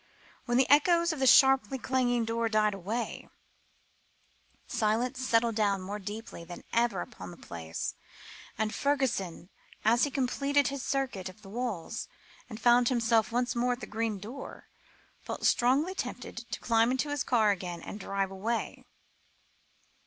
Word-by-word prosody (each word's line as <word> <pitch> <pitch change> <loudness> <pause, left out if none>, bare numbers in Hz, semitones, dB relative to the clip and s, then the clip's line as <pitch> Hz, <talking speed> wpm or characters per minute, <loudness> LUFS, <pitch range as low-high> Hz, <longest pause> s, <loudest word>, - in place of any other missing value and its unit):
When 240 -1 +1
the 260 - +4
echoes 335 +4 +4
of 305 - -6
the 265 - +3
sharply 270 +1 +6
clanging 245 -2 +1
door 230 0 0
died 215 -1 +2
away, 210 +5 -4 1.4
silence 240 +2 0
settled 230 -2 +2
down 205 -2 +1
more 205 +3 -5
deeply 205 -2 -7
than 175 +1 -10
ever 230 -5 +2
upon - - -8
the 175 - -11
place; 80 -1 -5 0.6
and 215 0 -1
Fergusson, 245 -11 -1 0.4
as 235 +2 +4
he 285 - +2
completed 280 +1 +1
his 280 -1 -4
circuit 255 -9 -2
of 210 +4 -16
the 195 - -11
walls, 220 -6 -4 0.4
and 220 -2 -7
found 240 0 +5
himself 230 -3 +2
once 245 +1 0
more 245 +1 +2
at 245 - -7
the - - -6
green 220 -1 -2
door, 230 +8 -9 0.5
felt - - -5
strongly 270 +9 +3
tempted - - -6
to - - -4
climb 230 0 +3
into 260 +3 0
his 290 -2 -1
car 220 -4 +3
again 180 -3 -4
and 205 - -7
drive 195 -1 -2
away. 220 +5 -3
235 Hz, 155 wpm, -30 LUFS, 210-260 Hz, 1.4 s, sharply